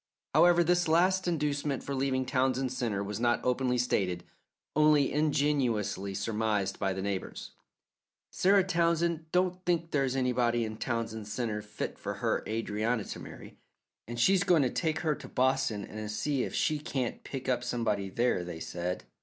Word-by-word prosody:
However, 175 0 +6
this 175 +1 +2
last 185 +3 +3
inducement 145 -4 -1
for 140 - -4
leaving 130 -1 0
Townsend 130 0 +1
Centre 115 -6 -1
was 105 +1 -4
not 120 0 +2
openly 125 0 +1
stated, 95 -7 0 0.5
only 150 -2 +4
ingeniously 130 -10 0
surmised 105 -1 -1
by 95 -1 0
the 95 0 -3
neighbours. 100 -1 -4 0.8
"Sarah 195 +1 +4
Townsend 170 -2 +1
don't 180 0 +1
think 170 -2 0
there's 135 -3 +1
anybody 120 -2 +1
in 110 0 -6
Townsend 110 -3 -3
Centre 110 -1 -2
fit 105 0 -6
for - - -4
her - - 0
Adrianna 110 +1 -1
to - - -6
marry, - - -11 0.5
and 120 +1 -6
so 120 - +3
she's 195 0 +4
goin' 175 -6 +4
to 125 - 0
take 160 -2 -1
her 155 -3 +1
to - - -9
Boston 125 -5 0
to 110 0 -6
see 135 +6 -1
if - - -6
she 155 -1 +1
can't 135 -6 -3
pick 135 -2 -6
up 125 -2 +1
somebody 110 -5 -1
there," 115 -3 +1
they 85 -2 -7
said. 90 +2 -4
125 Hz, 165 wpm, -30 LUFS, 110-155 Hz, 0.8 s, However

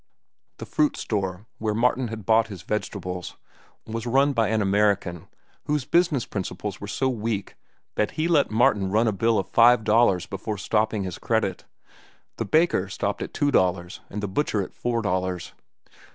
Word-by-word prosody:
The - - -7
fruit 300 -1 +1
store, 95 -2 -3
where 110 -1 -1
Martin 125 +2 +2
had 110 -3 -7
bought 110 +1 +4
his 95 -5 -9
vegetables, 90 -4 -4 0.5
was 115 +1 -5
run 135 +4 +3
by 115 -4 +2
an 110 +1 +1
American 100 -4 +1 0.4
whose 150 -3 0
business 165 -5 +2
principles 100 0 -5
were 100 - -5
so 130 +6 0
weak 110 -4 -3 0.4
that 105 - 0
he 155 +1 +1
let 160 -5 +3
Martin 105 -3 +2
run 110 +4 +2
a - - +3
bill 115 +3 +2
of 95 - -1
five 120 0 +5
dollars 105 -5 +3
before 100 +3 -5
stopping 105 +1 0
his 90 -2 -5
credit. - - -1 0.7
The - - -2
baker 155 - +2
stopped 100 0 -2
at - - -4
two 145 -1 +1
dollars, 90 -4 +1
and 105 +1 -5
the - - 0
butcher 105 -1 0
at - - -10
four 120 -1 -2
dollars. 95 -2 -2
105 Hz, 170 wpm, -25 LUFS, 95-120 Hz, 0.7 s, five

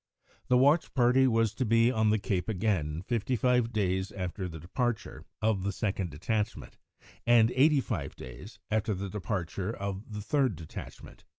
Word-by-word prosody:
The 125 - +4
watch 145 +6 +3
party 130 +1 +4
was 115 -3 +2
to 130 - -1
be 115 +1 +4
on 110 -3 +2
the 110 - +3
cape 100 -2 -2
again 90 -7 -1
fifty 120 +4 -1
five 125 0 +2
days 95 -3 0
after 90 -1 -4
the 80 -1 -8
departure 115 - -3 0.2
of 110 -3 +2
the 100 +2 -1
second 100 -4 -2
detachment, 105 +9 -3 0.5
and 120 -1 +6
eighty 145 +2 +4
five 85 - -4
days 65 - -10
after 110 -1 +1
the 95 0 -5
departure 95 -1 -3
of 100 0 -5
the 105 0 -5
third 130 - +1
detachment. 80 -1 -10
105 Hz, 165 wpm, -29 LUFS, 95-120 Hz, 0.5 s, and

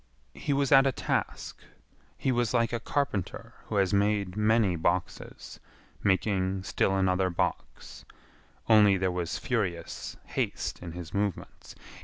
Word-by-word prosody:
He - - -4
was 140 -1 +1
at 135 -1 +7
a - - +3
task. - - -3 0.6
He 135 - 0
was 120 -1 0
like 115 -1 +1
a 120 - 0
carpenter 115 -6 -3
who 110 - -5
has 100 0 +2
made 100 -2 +1
many 105 -3 +2
boxes, 85 +2 -3 0.4
making 95 -1 +1
still 95 0 +1
another 95 0 +2
box, 85 - -4 0.6
only 105 -3 +6
there 95 0 0
was 90 -1 -3
furious 90 -9 -3
haste - - -3
in 85 -2 -7
his 85 -2 -8
movements. 100 -2 -4
100 Hz, 135 wpm, -28 LUFS, 90-115 Hz, 0.6 s, at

